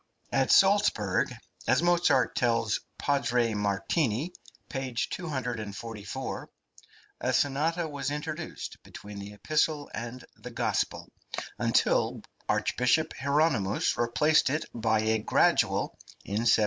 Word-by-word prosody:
At 135 -1 +2
Salzburg, 195 - +4 0.4
as 140 - +3
Mozart 175 -7 +3
tells 115 -3 +1 0.2
Padre 125 -5 +1
Martini 110 - 0 0.3
(p. 135 -2 -4
244), 115 - -4 0.7
a - - 0
sonata 160 +5 +1
was 145 -2 -3
introduced 150 +3 -5
between 105 0 -10
the 100 +1 -8
epistle 150 +5 0
and 120 +3 -6
the - - -9
gospel, - - -1 0.5
until - - +2 0.3
Archbishop 125 +6 +2
Hieronymus 140 -7 +1
replaced 135 +6 +3
it 150 +3 -1
by 110 -2 +1
a 110 0 +2
gradual 105 - +2 0.3
in 105 +4 -1
1763. - - +7
130 Hz, 105 wpm, -29 LUFS, 110-150 Hz, 0.7 s, 1763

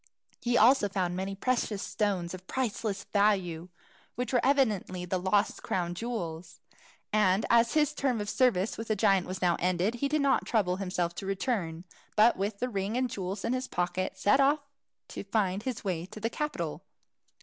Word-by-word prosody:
He 240 0 +1
also 235 -2 +5
found 185 -3 -1
many 190 +1 -3
precious 220 -2 -1
stones 195 -6 -1
of 185 0 -9
priceless 220 -5 -2
value, 185 -5 +1 0.5
which 250 +1 -3
were 245 - +3
evidently 215 -10 +1
the 185 +1 -1
lost 190 +3 +1
crown 175 -2 -2
jewels. 175 -6 -5 0.5
And 210 -1 +3
as 235 +2 +4
his 300 -1 +3
term 265 -5 0
of 205 - -3
service 220 -4 +1
with 225 - -5
the 215 - +1
giant 195 -3 +3
was 185 0 -5
now 175 -1 +3
ended, 180 +4 +1
he 245 +4 -1
did 305 +1 +1
not 275 - +3
trouble 185 -5 +1
himself 180 -3 -2
to 195 - -5
return, 190 -5 -2 0.3
but 220 +3 +6
with 200 +2 -2
the 250 - -1
ring 205 0 -2
and 255 0 +1
the - - -5
jewels 190 +1 -4
in 230 - 0
his 255 0 -2
pocket 180 +1 -2
set 205 +7 +3
off 285 +2 +4 0.5
to - - -6
find 195 -1 0
his 250 0 -4
way 180 -3 -2
to 215 - -10
the 225 +2 -2
capital. 300 +3 -3
205 Hz, 185 wpm, -29 LUFS, 185-240 Hz, 0.5 s, but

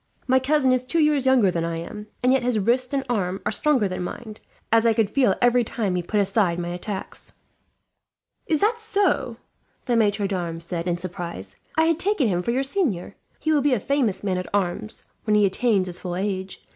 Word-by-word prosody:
My 260 0 +4
cousin 265 0 +2
is 255 -1 +2
two 295 +6 -2
years 300 -4 +3
younger 245 -8 +5
than 170 -1 -1
I 165 0 -2
am, 210 +5 -7 0.2
and 250 +1 +4
yet 265 - +3
his 245 -2 +1
wrist 240 +5 +1
and 275 -1 0
arm 195 -6 -1
are - - +1
stronger 270 -9 +2
than 185 -1 -4
mine, 215 +4 -7 0.3
as 225 0 +5
I 230 -1 +4
could 220 -3 +1
feel 250 -8 +3
every 245 0 +4
time 215 -4 -2
he 180 - 0
put 205 +5 -1
aside 195 -3 +2
my 175 0 -3
attacks." 190 +3 -4 1.1
"Is 310 -3 +1
that 450 +3 +2
so?" 420 -3 0 0.5
the 245 - +1
maitre 205 -2 +2
d'armes 170 -4 -3
said, 170 0 -4
in 175 -1 0
surprise. 170 - -6 0.2
"I 320 - +5
had 325 0 +2
taken 370 - +2
him 180 -4 0
for 205 - -4
your 255 +3 +1
senior. 270 - -1 0.2
He 315 - 0
will 300 -2 +3
be 280 -2 +3
a - - -1
famous 250 -4 0
man 185 -2 0
at 180 - -6
arms, 205 +3 -2 0.2
when 210 -1 +3
he 210 -1 +5
attains 200 0 +2
his 180 -1 -5
full 175 -2 -4
age. 190 0 -3
215 Hz, 215 wpm, -24 LUFS, 185-260 Hz, 1.1 s, younger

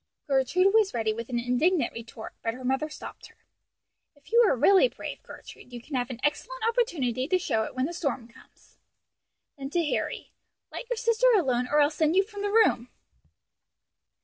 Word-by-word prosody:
Gertrude 315 +8 +2
was 435 - +3
ready 220 -2 0
with 230 +2 -7
an 245 - -2
indignant 250 +8 +1
retort, 225 -1 -9
but 225 +1 -2
her 255 - -10
mother 265 +4 0
stopped - - -10
her. - - -26 0.7
"If 285 +6 -22
you 470 - +5
are - - +3
really 390 - +5
brave, - - -8
Gertrude, 245 - -13
you 245 - -7
can 280 +5 -14
have 250 -1 -1
an 245 -3 -7
excellent - - -2
opportunity 295 - 0
to 370 - +2
show 225 -11 -1
it - - -9
when 255 0 0
the 335 - -4
storm 280 -8 -3
comes." 235 - -22 0.8
Then 270 0 -5
to 340 +2 0
Harry, - - -3 0.4
"Let - - -8
your 485 - -2
sister 460 +2 +2
alone, 250 - +1
or 295 +3 +2
I'll 290 +1 +3
send 315 +1 +1
you 390 - +5
from 405 0 -9
the 410 - -1
room." 405 - +3
290 Hz, 190 wpm, -27 LUFS, 245-390 Hz, 0.8 s, you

